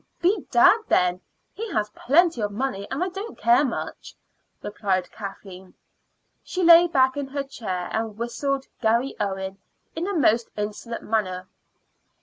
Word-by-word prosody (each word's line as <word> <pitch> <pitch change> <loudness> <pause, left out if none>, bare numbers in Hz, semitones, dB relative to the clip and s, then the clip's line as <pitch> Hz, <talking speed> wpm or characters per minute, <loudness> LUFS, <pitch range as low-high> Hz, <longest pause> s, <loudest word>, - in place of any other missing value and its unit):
"Bedad, 365 - +4
then! 180 0 +2 0.3
he 450 0 -6
has 210 0 -1
plenty 320 +3 +2
of 205 -1 -1
money, 205 -3 -3
and 275 +6 -1
I 370 - -1
don't 395 +5 -7 0.3
much - - -6 0.4
care," - - -6
replied 185 -4 -1
Kathleen. 190 -2 -9 0.7
She 370 - -3
lay 340 +1 +8
back 260 -5 +3
in 285 -1 -3
her 280 +1 -3
chair 195 -10 -5
and 220 -1 -3
whistled 270 +4 -2 0.2
"Garry 235 +4 +1
Owen" 195 -1 -3 0.4
in 335 +3 -2
a 400 - -2
most 235 -6 +2
insolent 210 +3 -5
manner. 185 -4 -2
235 Hz, 140 wpm, -24 LUFS, 200-290 Hz, 0.7 s, lay